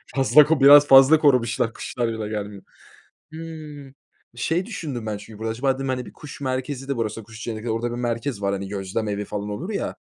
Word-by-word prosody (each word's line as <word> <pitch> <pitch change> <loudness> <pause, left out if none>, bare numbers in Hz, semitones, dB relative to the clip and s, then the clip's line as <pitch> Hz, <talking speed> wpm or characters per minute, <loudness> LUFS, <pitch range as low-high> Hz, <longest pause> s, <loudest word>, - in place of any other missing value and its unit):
Fazla 140 +2 +6
ko 160 +2 +2
biraz 145 +1 +8
fazla 135 +3 +7
korumuşlar. 120 -5 +2
Kuşlar 120 -2 -3
bile 110 -2 -4
gelmiyor. 105 -2 -6 0.7
Hımm, 155 -4 -9 0.4
şey 165 +9 -1
düşündüm 145 - -6
ben 105 - -2
çünkü 105 +1 -12
burada. 110 0 -3
Acaba 130 +4 0
dedim, 135 0 -5
hani, 125 -1 -2
bir - - -11
kuş 150 -2 -11
merkezi 130 0 -4
de 140 - -1
burası, 115 -1 -3
kuş 110 +1 -12
cenneti. 115 0 -4
Orada 115 +2 -2
bir 120 - -5
merkez 120 -2 -3
var, 100 0 0
hani, 100 0 -4
gözlem 100 +2 -3
evi 105 0 -3
falan 105 0 -5
olur 155 - -5
ya, 200 - -3
120 Hz, 200 wpm, -23 LUFS, 110-140 Hz, 0.7 s, biraz